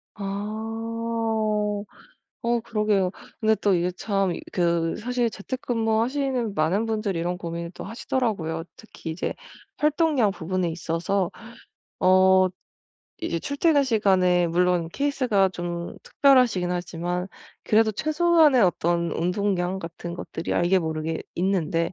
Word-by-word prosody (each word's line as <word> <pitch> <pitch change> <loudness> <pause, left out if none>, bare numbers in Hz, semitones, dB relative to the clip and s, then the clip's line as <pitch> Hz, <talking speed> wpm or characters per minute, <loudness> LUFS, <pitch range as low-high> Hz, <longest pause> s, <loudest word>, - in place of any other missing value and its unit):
아. 220 0 -2 0.6
어 235 0 +1
그러게요. 210 -4 +1 0.3
근데 220 0 +3
또 200 -2 +2
이게 175 +1 +1
참 195 -1 -1 0.2
그 170 -2 +1
사실 240 +1 0
재택근무하시는 235 +1 -1
많은 190 +8 +1
분들이 215 -5 -1
이런 175 +2 -1
고민을 170 0 -5
또 - - -8
하시더라고요. 200 -8 -2
특히 200 -7 -9
이제 160 - -3 0.4
활동량 300 -7 +2
부분에 185 -1 -2
있어서 170 +3 -1 0.7
어 185 0 +5 0.7
이제 250 - -2
출퇴근 285 0 +2
시간에 185 -6 +3
물론 175 -1 +2
케이스가 255 -8 +1
좀 175 -1 -5
특별하시긴 245 -10 +3
하지만 175 +1 -3 0.4
그래도 220 0 +4
최소한의 310 - +4
어떤 170 -1 +1
운동량 180 +1 0
같은 170 +1 -7
것들이 165 -1 -4
알게 175 +2 +3
모르게 160 0 -3
있는데 170 -2 0
195 Hz, 275 characters per minute, -25 LUFS, 175-225 Hz, 0.7 s, 어